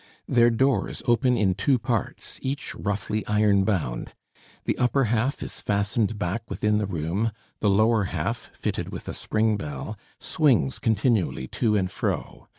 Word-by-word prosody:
Their 120 -1 +5
doors 130 +4 +1
open 125 0 +3
in 95 -4 +3
two 135 +7 +2
parts, 115 -2 -3
each 140 +3 -3
roughly 105 +1 -2
iron 105 -2 +3
bound; 80 - -2 0.5
the - - +1
upper 125 +3 +3
half 120 +3 0
is - - -7
fastened 105 +2 0
back 100 +3 -2
within 105 -1 +1
the 105 - -1
room, 90 +6 -1 0.3
the 105 - +2
lower 110 +1 +3
half, - - -3
fitted - - -3
with - - -7
a - - -3
spring 110 0 0
bell, 75 +4 -5 0.2
swings 125 - +2
continually 110 - +1
to 110 -3 +1
and 95 -3 0
fro. - - -3
110 Hz, 155 wpm, -25 LUFS, 100-120 Hz, 0.5 s, Their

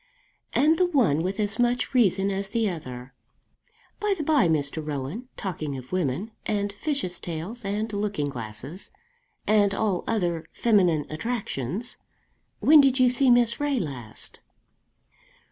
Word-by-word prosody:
"And 315 +3 +4
the 365 - +4
one 230 - +2
with 190 +4 -3
as 205 +1 0
much 245 +2 +1
reason 200 -5 +3
as 195 0 -3
the 225 0 +1
other. 130 -8 -6 0.9
By 420 -1 +1
the 310 - -2
by, 290 - +4
Mr. 155 -1 0
Rowan, 150 - -4
talking 155 -7 -4
of 125 -1 -10
women, 180 - -1
and 205 -1 -1
fishes' 205 - -1
tails, 175 +8 -5
and 210 +2 -2
looking 200 -7 -1
glasses, 125 - -7 0.6
and 205 -2 +3
all 205 -5 0
other 175 -7 -1
feminine 180 -10 +3
attractions, 200 - -3 0.6
when 305 0 +8
did 270 -2 +3
you 255 -1 +6
see 255 +2 +3
Miss 240 0 +4
Ray 290 -3 +1
last?" 125 - -6
200 Hz, 140 wpm, -26 LUFS, 155-240 Hz, 0.9 s, when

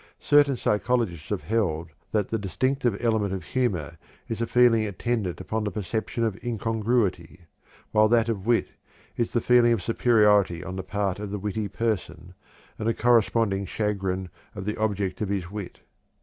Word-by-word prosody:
Certain 145 -2 +4
psychologists 105 -8 0
have 105 - -2
held 85 -7 -1 0.2
that 105 -3 0
the 115 - -1
distinctive 120 - 0
element 110 -4 +1
of 95 - -6
humor 85 - -2 0.3
is 115 -3 -4
the 115 - -1
feeling 120 -2 +4
attendant 105 -2 -2
upon 110 0 -3
the 105 - -1
perception 110 +3 -3
of 110 -3 -2
incongruity; 110 -6 -1 0.5
while 110 0 +5
that 115 0 +3
of 110 -3 -3
wit 120 -1 +2 0.5
is 120 - -1
the 120 - +3
feeling 120 0 +5
of 110 -6 +1
superiority 105 -7 +3
on 95 - -6
the 95 - -3
part 100 0 -2
of 105 -1 -5
the 105 - -3
witty 105 +1 -3
person, 100 -5 -3 0.5
and 110 - -2
the 115 - +1
corresponding 115 -4 +2
chagrin 95 -2 -2 0.3
of 95 -2 -6
the 105 - -2
object 100 -3 -1
of 105 - -1
his 95 -3 -2
wit. 100 -3 -7
105 Hz, 165 wpm, -26 LUFS, 95-115 Hz, 0.5 s, while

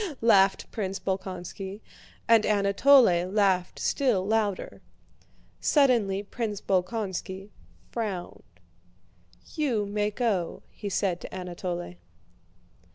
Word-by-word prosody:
laughed 195 -4 +3
Prince 195 -4 -3
Bolkónski, 190 +1 -5 0.5
and 230 -2 +6
Anatole 215 +7 +5 0.3
laughed 190 -3 +1
still 235 -9 +1
louder. 210 -2 -1 0.8
Suddenly 230 -9 +2
Prince 210 -1 -4
Bolkónski 190 0 -2 0.4
frowned. 205 -7 -4 1.1
"You 255 -10 0
may 205 +1 -1
go," 205 -6 -2
he 205 - -6
said 185 -2 -1
to - - -8
Anatole. 175 - -5
200 Hz, 90 wpm, -27 LUFS, 190-220 Hz, 1.1 s, and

